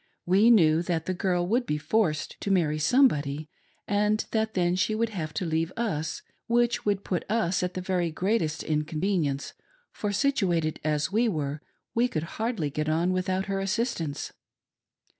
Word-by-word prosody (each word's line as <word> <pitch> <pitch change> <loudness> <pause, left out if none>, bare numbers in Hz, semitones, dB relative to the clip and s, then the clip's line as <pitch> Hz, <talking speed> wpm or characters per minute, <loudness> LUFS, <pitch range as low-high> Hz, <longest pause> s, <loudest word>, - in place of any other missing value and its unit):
We 195 +6 +5
knew 165 -8 +5
that 170 -2 -2
the 185 - -1
girl 180 -1 0
would 240 +6 0
be 150 - 0
forced 155 -1 0
to - - -3
marry 160 -6 +2
somebody, 150 - +2 0.4
and 210 +1 +1
that 220 -1 0
then 175 -1 +2
she 210 +3 +1
would 230 +1 0
have 165 -8 -4
to 185 - -1
leave 165 +1 0
us, 160 -10 -2 0.2
which 240 0 +2
would 200 -1 +1
put 180 - -2
us 205 -5 +1
to 180 - +1
the 185 0 -6
very 180 -2 0
greatest 165 -2 -1
inconvenience, 155 -1 -1 0.4
for 210 - -3
situated 190 - +1
as 150 +2 0
we 230 +3 +2
were 150 -5 -3 0.3
we 235 +2 +3
could 155 -10 -3 0.2
hardly 220 - -1
get 155 +2 -2
on 170 +4 +1
without 185 +1 -1
her 195 -1 -2
assistance. 195 - -2
180 Hz, 165 wpm, -27 LUFS, 155-215 Hz, 0.4 s, We